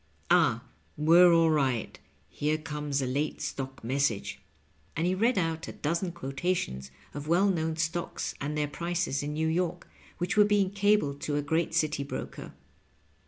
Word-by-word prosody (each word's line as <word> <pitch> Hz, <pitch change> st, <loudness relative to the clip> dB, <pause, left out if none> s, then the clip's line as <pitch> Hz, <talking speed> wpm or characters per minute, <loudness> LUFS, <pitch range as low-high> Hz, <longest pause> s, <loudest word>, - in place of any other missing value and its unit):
Ah, -, -, +4 dB, 0.3 s
we're 170 Hz, +4 st, +7 dB
all 165 Hz, -1 st, +5 dB
right; 135 Hz, -6 st, 0 dB, 0.3 s
here 150 Hz, +1 st, -1 dB
comes 150 Hz, -3 st, -3 dB
a -, -, 0 dB
late 140 Hz, +4 st, -2 dB
stock 135 Hz, -2 st, -5 dB
message/' 130 Hz, -3 st, -1 dB, 0.6 s
and 160 Hz, -, +1 dB
he 180 Hz, -, +2 dB
read 230 Hz, +6 st, +2 dB
out 165 Hz, -2 st, -1 dB
a -, -, -6 dB
dozen 170 Hz, +4 st, -2 dB
quotations 135 Hz, -, -3 dB, 0.2 s
of 145 Hz, +1 st, -6 dB
well 185 Hz, +5 st, +4 dB
known 160 Hz, -2 st, -1 dB
stocks 165 Hz, +2 st, -2 dB
and 150 Hz, +2 st, -2 dB
their 150 Hz, -1 st, +1 dB
prices 170 Hz, -2 st, -2 dB
in 145 Hz, +1 st, -4 dB
Kew 160 Hz, +1 st, 0 dB
York, 175 Hz, +1 st, -1 dB, 0.3 s
which 175 Hz, +1 st, -1 dB
were 210 Hz, -, +7 dB
being 205 Hz, -2 st, +2 dB
cabled 200 Hz, -8 st, +2 dB
to 145 Hz, -, -2 dB
a 145 Hz, -, 0 dB
great 160 Hz, +4 st, 0 dB
citj 155 Hz, -4 st, 0 dB
broker. -, -, -6 dB
160 Hz, 165 wpm, -29 LUFS, 145-175 Hz, 0.6 s, we're